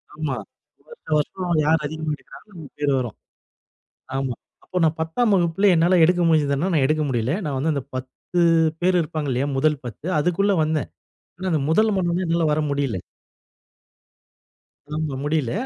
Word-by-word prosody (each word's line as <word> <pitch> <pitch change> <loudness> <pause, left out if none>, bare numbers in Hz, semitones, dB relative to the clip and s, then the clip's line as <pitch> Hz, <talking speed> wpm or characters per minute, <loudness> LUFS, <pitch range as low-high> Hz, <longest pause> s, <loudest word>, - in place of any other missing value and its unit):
ஆமா. 150 -4 -2 0.5
வருஷம் 475 - -4
வருஷம் 175 +1 -1
யார் 160 0 +3
அதிகமா 155 +1 -3
எடுக்குறாங்களோ 210 +6 -16
நமக்கு 155 -4 -11
பேர் 145 -1 +1
வரும். 120 -4 -4 1.0
ஆமா. 135 -3 -1 0.3
அப்போ 180 - -3
நான் 160 +1 +2
10ஆம் 205 +8 +1
வகுப்பிலே 180 +2 +3
என்னால 175 +2 +4
எடுக்க 175 +1 +3
முடிஞ்சிதுனா, 150 +2 +2
நான் 140 -4 +3
எடுக்க 155 +1 +1
முடில. 125 +5 0
நான் 140 -3 -2
வந்து 155 +3 +1
அந்த 140 - -2
10 130 +7 -4 0.4
பேர் 180 0 +3
இருப்பாங்க 155 -3 -3
இல்லையா? 135 +4 0
முதல் 150 0 +2
10 120 +7 -8
அதுக்குள்ள 185 +6 +2
வந்தேன். 155 -3 -1 0.5
ஆனா 185 0 -2
அந்த 155 - +2
1 215 +5 +3
மானவனா 180 0 0
என்னால 165 -1 +1
வரமுடியல. 140 -8 -1 2.0
ஆமா. 155 -3 -2
முடில 145 -5 0
155 Hz, 150 wpm, -23 LUFS, 145-175 Hz, 2.0 s, என்னால